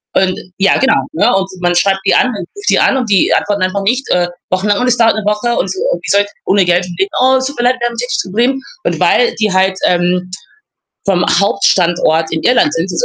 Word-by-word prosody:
Und 185 Hz, -1 st, +1 dB, 0.2 s
ja, 195 Hz, 0 st, +3 dB
genau, 265 Hz, -, +1 dB
ne, 160 Hz, -, +1 dB
und 195 Hz, 0 st, 0 dB
man 175 Hz, 0 st, +1 dB
schreibt 195 Hz, +2 st, +2 dB
die -, -, +3 dB
an 255 Hz, -, +3 dB
und 220 Hz, -5 st, -5 dB
ruft 405 Hz, -, -10 dB
die -, -, +3 dB
an 270 Hz, -, +2 dB
und 250 Hz, -3 st, -2 dB
die 195 Hz, -, +3 dB
antworten 205 Hz, -1 st, -1 dB
einfach 185 Hz, +2 st, -1 dB
nicht, 245 Hz, +6 st, 0 dB
äh, 175 Hz, -1 st, +1 dB, 0.2 s
wochenlang 200 Hz, +2 st, 0 dB
und 250 Hz, -, 0 dB
es 245 Hz, -1 st, +2 dB
dauert 230 Hz, -1 st, +4 dB
'ne 215 Hz, -, -3 dB
Woche 210 Hz, +4 st, -1 dB
und, -, -, -1 dB
äh, -, -, -2 dB
wie -, -, -7 dB
sollte 200 Hz, 0 st, +2 dB
ich -, -, -40 dB
ohne 195 Hz, -1 st, +2 dB
Geld 175 Hz, 0 st, +2 dB
schon 180 Hz, -1 st, -9 dB
leben. 195 Hz, +1 st, 0 dB
„Oh, 260 Hz, +1 st, +4 dB
es 260 Hz, -, -2 dB
tut 275 Hz, 0 st, -6 dB
mir 240 Hz, -, 0 dB
leid, 250 Hz, +1 st, +3 dB
wir 240 Hz, -, 0 dB
haben 240 Hz, -, -5 dB
ein -, -, -10 dB
technisches 245 Hz, +1 st, -2 dB
Problem.“ 240 Hz, +8 st, -1 dB, 0.2 s
Und -, -, -1 dB
weil 475 Hz, -1 st, +2 dB
die 215 Hz, -2 st, -1 dB
halt, 190 Hz, 0 st, +1 dB
ähm, 180 Hz, +1 st, 0 dB, 0.8 s
vom 180 Hz, -3 st, +1 dB, 0.2 s
Hauptstandort 175 Hz, -5 st, +1 dB
in 160 Hz, -, -2 dB
Irland 245 Hz, -11 st, +2 dB
sind, 165 Hz, +3 st, -2 dB
200 Hz, 250 wpm, -13 LUFS, 180-240 Hz, 0.8 s, dauert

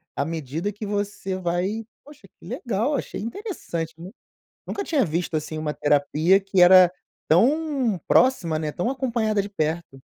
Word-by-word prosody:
à 140 Hz, -, -1 dB
medida 160 Hz, +4 st, -3 dB
que 210 Hz, +2 st, -7 dB
você 205 Hz, -2 st, -3 dB
vai 185 Hz, +5 st, -2 dB, 0.2 s
Poxa, 295 Hz, 0 st, -16 dB
que -, -, -16 dB
legal, 240 Hz, +4 st, -1 dB
achei 255 Hz, -, -4 dB
interessante, 225 Hz, -, -5 dB
né. 175 Hz, +3 st, -9 dB, 0.6 s
Nunca 400 Hz, -, -4 dB
tinha 300 Hz, -9 st, +1 dB
visto 170 Hz, -1 st, -2 dB
assim 155 Hz, 0 st, -3 dB
uma 150 Hz, -1 st, -2 dB
terapia 150 Hz, +5 st, +3 dB
que 195 Hz, -1 st, +1 dB
era 180 Hz, 0 st, +8 dB, 0.4 s
tão 265 Hz, -, +2 dB
próxima, 175 Hz, -12 st, +3 dB
né, 155 Hz, -1 st, -3 dB
tão 180 Hz, +10 st, -2 dB
acompanhada 235 Hz, -6 st, 0 dB
de 200 Hz, -, -7 dB
perto. 160 Hz, -6 st, -3 dB
190 Hz, 155 wpm, -24 LUFS, 165-230 Hz, 0.6 s, era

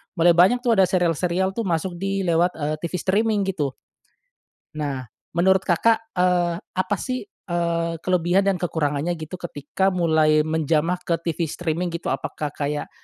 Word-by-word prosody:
mulai 175 Hz, 0 st, +5 dB
banyak, 190 Hz, +9 st, +4 dB
tuh, 240 Hz, -, +2 dB
ada 190 Hz, -4 st, +5 dB
serial-serial, 180 Hz, +1 st, +1 dB
tuh, 225 Hz, +1 st, -3 dB
masuk 175 Hz, +1 st, -2 dB
di 195 Hz, 0 st, -1 dB
lewat, 175 Hz, +1 st, +2 dB
eee, 150 Hz, -1 st, -2 dB
TV 170 Hz, +2 st, -5 dB
streaming 205 Hz, +3 st, +1 dB
gitu. 155 Hz, -9 st, -2 dB, 1.0 s
Nah, 140 Hz, -4 st, -3 dB, 0.3 s
menurut 190 Hz, +2 st, +4 dB
Kakak, 225 Hz, +5 st, +2 dB
eee, 180 Hz, -1 st, +2 dB, 0.2 s
apa, 185 Hz, +2 st, 0 dB
sih, 255 Hz, +4 st, -3 dB, 0.2 s
eee, 170 Hz, -1 st, -1 dB
kelebihan 180 Hz, +1 st, +2 dB
dan 195 Hz, -2 st, +1 dB
kekurangannya 160 Hz, -2 st, -1 dB
gitu, 160 Hz, +2 st, -7 dB
ketika 175 Hz, +3 st, -2 dB
mulai 160 Hz, -3 st, +3 dB
menjamah 160 Hz, +2 st, +1 dB
ke 170 Hz, -, -1 dB
TV 165 Hz, 0 st, -1 dB
streaming 170 Hz, +2 st, -3 dB
gitu. 170 Hz, -, -3 dB
Apakah 150 Hz, -1 st, -3 dB
kayak, 145 Hz, 0 st, -3 dB
175 Hz, 150 wpm, -23 LUFS, 160-190 Hz, 1.0 s, mulai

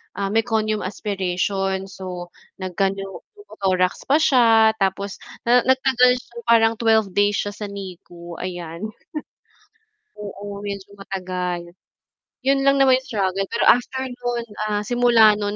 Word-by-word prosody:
ah, 200 Hz, -1 st, -2 dB
meconium 220 Hz, -1 st, +1 dB
aspiration 195 Hz, -1 st, -2 dB
so 180 Hz, -2 st, -7 dB, 0.3 s
nagka 185 Hz, +1 st, 0 dB
pneumothorax 195 Hz, -, -3 dB
pa 285 Hz, +3 st, +5 dB
siya 225 Hz, -6 st, +5 dB
tapos, 195 Hz, 0 st, -1 dB, 0.3 s
na 245 Hz, +1 st, +4 dB
nagtagal 260 Hz, -1 st, +4 dB
siya 235 Hz, -, -18 dB
parang 225 Hz, -1 st, +4 dB
12 220 Hz, -3 st, +3 dB
days 205 Hz, +2 st, +2 dB
siya 205 Hz, -, -4 dB
sa 210 Hz, -, -6 dB
NICU, 180 Hz, -3 st, -9 dB
ayan. 175 Hz, +1 st, -5 dB, 1.3 s
Oo, 205 Hz, 0 st, -7 dB
medyo 200 Hz, -1 st, -6 dB
matagal. 185 Hz, -2 st, -4 dB, 0.8 s
Yun 275 Hz, 0 st, +3 dB
lang 275 Hz, 0 st, +4 dB
naman 260 Hz, -2 st, +5 dB
yung 260 Hz, -, -17 dB
struggle, 195 Hz, -4 st, 0 dB
pero 230 Hz, -, -1 dB
after 260 Hz, +2 st, +3 dB
no'n, 245 Hz, -2 st, -4 dB, 0.2 s
ah, 205 Hz, 0 st, -1 dB
simula 240 Hz, -2 st, +5 dB
no'n 205 Hz, 0 st, -2 dB
205 Hz, 125 wpm, -22 LUFS, 190-235 Hz, 1.3 s, pa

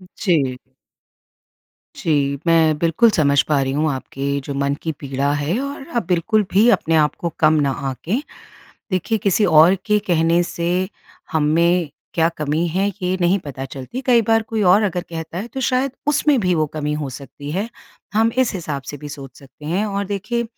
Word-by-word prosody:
जी। 140 Hz, -9 st, +1 dB, 1.4 s
जी, 140 Hz, -3 st, 0 dB
मैं 160 Hz, -2 st, +4 dB
बिल्कुल 170 Hz, +9 st, +3 dB
समझ 140 Hz, -6 st, +3 dB
पा 145 Hz, -3 st, +2 dB
रही 135 Hz, 0 st, -1 dB
हूँ 155 Hz, +2 st, +1 dB
आपके 140 Hz, +1 st, -3 dB
जो 140 Hz, -, -4 dB
मन 140 Hz, 0 st, 0 dB
की 160 Hz, -, -2 dB
पीड़ा 140 Hz, 0 st, -1 dB
है 145 Hz, +7 st, -1 dB
और 280 Hz, 0 st, -5 dB
आप 235 Hz, -, 0 dB
बिल्कुल 190 Hz, +5 st, +2 dB
भी 215 Hz, +5 st, +5 dB
अपने 165 Hz, -8 st, +2 dB
आप 150 Hz, -1 st, +3 dB
को 170 Hz, -, -2 dB
कम 155 Hz, 0 st, +5 dB
ना 140 Hz, -1 st, +1 dB, 0.2 s
आंकें। 180 Hz, -, -2 dB, 0.7 s
देखिए 185 Hz, +4 st, 0 dB
किसी 200 Hz, +1 st, +2 dB
ओर 160 Hz, +3 st, +6 dB
के 210 Hz, -1 st, +3 dB
कहने 170 Hz, 0 st, +3 dB
से, 175 Hz, +2 st, -1 dB, 0.4 s
हम 160 Hz, -, +2 dB
में 170 Hz, +2 st, +2 dB, 0.2 s
क्या 165 Hz, -1 st, +3 dB
कमी 155 Hz, +3 st, 0 dB
है 190 Hz, +5 st, 0 dB
ये 180 Hz, +1 st, 0 dB
नहीं 175 Hz, +3 st, +3 dB
पता 135 Hz, -2 st, -6 dB
चलती, 135 Hz, -, -7 dB
कई 240 Hz, -3 st, +5 dB
बार 225 Hz, +1 st, +2 dB
कोई 220 Hz, -1 st, -2 dB
और 190 Hz, +3 st, +5 dB
अगर 180 Hz, -4 st, -1 dB
कहता 165 Hz, 0 st, -5 dB
है 205 Hz, -, -4 dB
तो 265 Hz, -, -3 dB
शायद 255 Hz, +1 st, +1 dB
उसमें 295 Hz, -1 st, +3 dB
भी 180 Hz, -3 st, +1 dB
वो 155 Hz, -2 st, +1 dB
कमी 150 Hz, -1 st, -2 dB
हो 150 Hz, -2 st, -3 dB
सकती 145 Hz, +2 st, -9 dB
है, 195 Hz, +8 st, -2 dB, 0.5 s
हम 225 Hz, +1 st, +3 dB
इस 260 Hz, -3 st, +3 dB
हिसाब 150 Hz, -7 st, -4 dB
से 145 Hz, -, -7 dB
भी 145 Hz, +1 st, -9 dB
सोच 135 Hz, -3 st, -10 dB
सकते 140 Hz, +2 st, -16 dB
हैं। 180 Hz, +7 st, 0 dB
और 200 Hz, -1 st, -2 dB
देखिए 210 Hz, +5 st, -2 dB
165 Hz, 190 wpm, -20 LUFS, 145-205 Hz, 1.4 s, ओर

